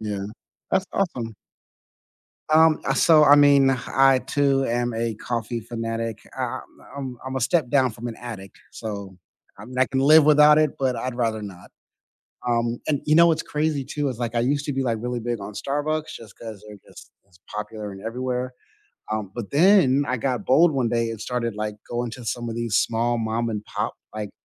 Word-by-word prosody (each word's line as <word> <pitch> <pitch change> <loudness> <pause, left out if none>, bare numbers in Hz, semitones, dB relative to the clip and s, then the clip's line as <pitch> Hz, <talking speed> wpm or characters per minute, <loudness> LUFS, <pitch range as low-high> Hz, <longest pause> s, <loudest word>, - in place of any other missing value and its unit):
Yeah, 100 -2 -4 0.4
that's 190 - +2
awesome. 125 - -2 1.2
Um, 160 0 +5
I 135 - +1
so, 155 +1 +5
I 145 -1 +8
mean, 140 -2 +6 0.2
I 135 0 +4
too 135 0 +1
am 120 0 -1
a 115 0 -2
coffee 115 +1 -3
fanatic. 115 -1 -4 0.2
I 130 0 -2 0.4
I'm 130 -3 -6
I'm 130 0 -5
a 130 - -1
step 130 +2 +1
down 130 -2 +3
from 115 +3 -7
an 115 - -6
addict, 105 -6 -9
so, 100 -4 -7 0.4
I 105 - -10
mean, 125 +2 -9
I 130 - +5
can 130 +1 -2
live 150 +3 +6
without 150 0 +7
it, 155 -2 +2
but 130 -2 0
I'd 130 0 -4
rather 115 -3 -1
not, 95 -4 -10 0.8
um, 120 0 0
and 145 -3 0
you 155 - +3
know 170 +1 +7
what's 165 -1 +2
crazy 150 -2 -1
too? 145 +1 -2
Is, 125 -3 -6
like, 120 -1 -3
I 115 - +2
used 140 +4 0
to 145 - -2
be, 135 0 -1
like, 115 -3 0
really 125 0 -3
big 120 0 -3
on 100 +2 -7
Starbucks 150 +7 -2
just 110 -4 -12
'cause 110 -3 -9
they're 105 -1 -11
just - - -15
just 90 -2 -26
popular 105 0 -6
and 95 0 -10
everywhere, 125 +2 -3 0.6
um, 105 -3 -3
but 120 -4 -6
then 145 -4 +5
I 130 - 0
got 125 -3 -2
bold 160 +5 +5
one 130 -4 0
day 115 0 0
and 115 -2 -7
started, 115 -1 -2
like, 105 0 -4
going 120 0 -3
to 125 0 -9
some 120 +1 -3
of 115 - -5
these 115 -3 -2
small 115 +4 +1
mom 115 +1 -1
and 105 -1 -4
pop, - - -3 0.2
like 105 -2 -5
120 Hz, 200 wpm, -23 LUFS, 115-140 Hz, 1.2 s, I